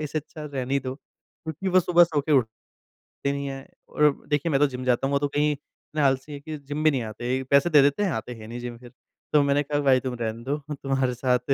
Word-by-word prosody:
इससे 155 +1 -2
अच्छा 155 +1 -9
रहने 135 -2 -3
ही 140 - +2
दो। 130 0 -4
क्योंकि 160 +5 -8
वो 185 0 +5
सुबह 175 0 +5
सो 155 -3 -1
के 150 +2 -1
उठते 115 -5 +1 0.6
नहीं 140 0 -3
हैं 135 0 -6 0.2
और 150 -1 +4 0.2
देखिए 150 +2 +1
मैं 135 - +3
तो 145 - +5
जिम 130 -1 -6
जाता 125 +2 +2
हूँ। 140 - -2
वो 140 - +3
तो 145 - 0
कहीं 150 +1 +1
इतने 150 +1 -6
आलसी 135 +1 +1
है 140 - -6
कि 155 +1 -7
जिम 145 +2 -5
भी 155 - +5
नहीं 130 -4 -1
आते, 120 +4 -3
पैसे 140 +5 +3
दे 150 -4 +7
देते 145 +9 +2
हैं 190 - +1
आते 115 +2 -4
हैं 110 -2 -11
नहीं 120 +2 -6
जिम 120 -1 -6
फ़िर। 120 0 -14 0.4
तो 150 - +6
मैंने 140 +1 +2
कहा 145 +1 -1
भाई 135 -2 +4
तुम 125 -1 -2
रहने 115 +1 -3
दो 140 +3 -1 0.3
तुम्हारे 135 -2 +1
साथ 125 0 +1
140 Hz, 255 wpm, -25 LUFS, 130-150 Hz, 0.6 s, दे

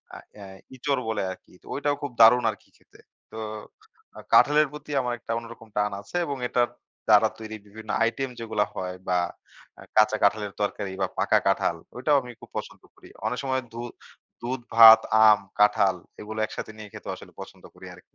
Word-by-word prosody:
আ - - -8 0.2
অ্যা 100 -1 -11 0.3
'ইঁচড়' 135 0 -1
বলে 110 - -1
আরকি। 90 - -13
তো - - -25
ঐটাও 145 0 0
খুব 145 - -4
দারুণ 120 +2 +7
আরকি 105 - -8
খেতে। - - -24 0.3
তো 110 - -9 1.0
কাঁঠালের 150 +1 +6
প্রতি 150 0 -9
আমার 125 -1 -2
একটা 105 - -7
অন্যরকম 115 -1 -12
টান 105 0 +1
আছে 100 - -13
এবং 140 -1 -3
এটার 120 -1 +1 0.4
দ্বারা 110 0 +6
তৈরি 110 -1 -7
বিভিন্ন 110 +1 -13
আইটেম 130 +3 -1
যেগুলো 110 -2 0
হয় 90 0 -4
বা 90 - +2 0.6
আ - - -12 0.2
কাঁচা 110 0 +5
কাঁঠালের 100 -1 +1
তরকারি 100 -1 -2
বা 95 - +2
পাকা - - +3
কাঁঠাল, 85 - +1 0.2
ওইটাও 145 +3 +3
আমি 125 -1 -10
খুব - - -14
পছন্দ - - -7
করি। - - -17 0.2
অনেক 125 +2 -2
সময় 130 -1 -1
দু 120 - -6 0.6
দুধ-ভাত, 115 -2 +7 0.2
আম, 105 -1 +7 0.2
কাঁঠাল 100 -2 +4 0.3
এগুলো 110 +1 -6
একসাথে 110 - -7
নিয়ে 105 -1 -10
খেতেও - - -6
আসলে - - -14
পছন্দ - - -12
করি - - -12
আরকি। - - -17
110 Hz, 180 wpm, -25 LUFS, 105-125 Hz, 1.0 s, দারুণ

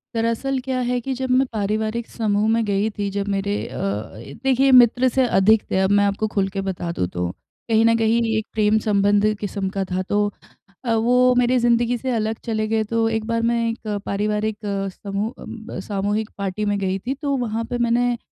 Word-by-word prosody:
दरअसल, 230 +4 0
क्या 260 -1 -1
है 250 0 0
कि 265 +3 -3
जब 260 0 -3
मैं 260 +1 +4
पारिवारिक 215 +2 -1
समूह 210 -2 0
में 230 0 +2
गई 205 +1 +1
थी, 205 -2 -3
जब 200 0 -3
मेरे 200 +1 -1
अ, - - -8 0.4
ए 120 +5 -10
देखिए, 270 +1 +3
मित्र 250 0 +6
से 260 +1 +2
अधिक 215 0 +4
थे 190 - +2
अब 190 0 +2
मैं 205 0 +4
आपको 200 +2 0
खुल 195 -2 +1
के 195 - 0
बता 175 -2 -3
दूँ 90 - -1
तो। 90 0 -3 0.4
कहीं 225 0 +4
न 230 0 +5
कहीं 225 +1 +2 0.2
एक 220 - -2
प्रेम 215 0 +3
संबंधित 205 0 +2
किस्म 200 -1 -3
का 195 0 -2
था, 185 +1 0
तो 205 +2 0 0.5
अ, 230 - +1
वो 250 +3 +4
मेरी 250 +1 +3
ज़िंदगी 240 0 +2
से 260 +2 -3
अलग 220 -1 -1
चले 215 -2 -1
गए। 220 0 +1
तो 225 +1 0
एक 220 -1 -2
बार 230 0 0
मैं 230 0 +1
एक 225 -1 -6 0.2
पारिवारिक 210 +1 -1 0.5
समूह 205 +3 -2
अम, - - -8
ब - - -6
सामूहिक 205 +2 -1
पार्टी 200 +1 -2
में 205 0 0
गई 190 0 -1
थी, 250 +7 -3
तो 280 0 -2
वहाँ 230 -2 -2
पर 245 - 0
मैंने 240 +1 +1
220 Hz, 210 wpm, -22 LUFS, 205-235 Hz, 0.5 s, मित्र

